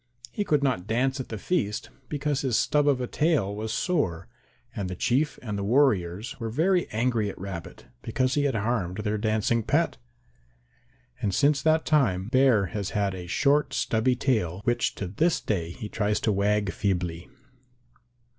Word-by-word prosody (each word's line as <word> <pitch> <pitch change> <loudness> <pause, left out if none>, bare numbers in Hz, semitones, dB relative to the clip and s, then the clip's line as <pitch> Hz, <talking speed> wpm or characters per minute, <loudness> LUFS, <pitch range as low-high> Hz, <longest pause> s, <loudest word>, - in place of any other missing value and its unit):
He 205 - -2
could 150 -7 +1
not 120 -9 0
dance 130 +5 0
at 130 - -5
the 110 - -4
feast 105 - -2 0.2
because 145 -1 -1
his 130 -5 +1
stub 145 -1 +2
of 140 -3 +3
a 125 - -1
tail 140 - +1
was 110 +1 -4
sore, 125 - -1 0.5
and 95 -3 -3
the 90 - -4
Chief 135 - +1
and 105 -4 -3
the - - -2
warriors 110 -1 +1
were 115 -2 -3
very 175 - +1
angry 115 -2 0
at - - -8
Rabbit 95 -3 -7 0.2
because 130 +3 0
he 145 -1 +1
had 135 - 0
harmed 105 -4 -1
their 105 +1 -1
dancing 110 +1 +1
pet. - - +1 1.2
And 100 -5 0
since 145 0 +3
that 160 +1 +2
time 110 -11 +2
Bear 130 -6 +4
has 100 -2 -2
had 100 -2 +1
a 90 -1 -7
short 140 - +2
stubby 115 +3 +1
tail 105 - 0
which 120 0 0
to 100 - -4
this 155 - +1
day 85 -6 -2
he 105 +5 -7
tries 105 0 0
to 110 - +2
wag 100 0 +1
feebly. 90 -2 -2
110 Hz, 175 wpm, -26 LUFS, 100-140 Hz, 1.2 s, Bear